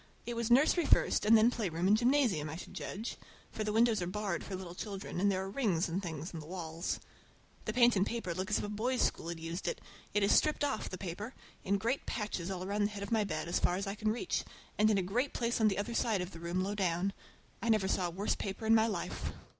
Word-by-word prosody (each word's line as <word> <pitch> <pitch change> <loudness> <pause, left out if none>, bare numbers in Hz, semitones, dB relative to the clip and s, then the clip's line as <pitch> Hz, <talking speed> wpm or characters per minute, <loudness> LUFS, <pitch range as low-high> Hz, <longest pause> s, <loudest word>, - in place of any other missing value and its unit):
It 240 - -3
was 235 -1 -1
nursery 295 +6 +5
first - - +4
and 225 +1 +8
then 225 +3 +5
playground 180 -7 -1
and 205 - +6
gymnasium, 235 - +2
I 155 - -5
should 175 - -9
judge; 215 +5 -5 0.3
for 215 - -3
the 210 - -1
windows 225 -1 +3
are 175 - -1
barred 195 -2 -2
for 195 - -5
little 185 -2 -7
children, 195 -1 -5
and 200 0 +4
there 190 0 -1
are - - -5
rings 195 -9 +1
and 175 +3 -2
things 165 -2 -5
in 165 - -5
the 150 - -9
walls. 165 -1 -3 0.7
The 215 - -2
paint 240 -1 +5
and 190 - +3
paper 215 -5 -2
look 185 +4 -3
as 210 - +3
if - - -2
a 205 - -3
boys' 240 +5 0
school - - 0
had 170 -1 -4
used 165 +3 -4
it. - - -1 0.4
It 205 - +3
is 200 - +4
stripped 305 -1 +3
off—the 220 -8 -2
paper—in 200 +1 -4
great 235 +7 -1
patches 205 -6 -3
all 185 -1 -3
around 205 +2 0
the - - +1
head 205 -1 -6
of 200 - -6
my 220 -2 +3
bed, 155 -6 -2
about - - -7
as - - +1
far 175 - +2
as 195 +2 -2
I 195 - -2
can 215 +1 0
reach, 240 +11 -1 0.3
and 215 +1 +4
in 210 - +3
a 190 - +1
great 245 +10 0
place 235 -1 0
on 220 - +6
the 200 - +1
other 205 +4 -2
side 225 -4 +1
of 180 +1 -5
the 165 - -10
room 170 +2 -1
low 200 +2 -2
down. 190 -1 0 0.5
I 230 - -1
never 215 -4 +3
saw 185 -2 +1
a - - -3
worse 190 +5 -1
paper 200 +2 -4
in 220 - +5
my 225 0 +5
life. 215 - -3
200 Hz, 265 wpm, -33 LUFS, 180-225 Hz, 0.7 s, and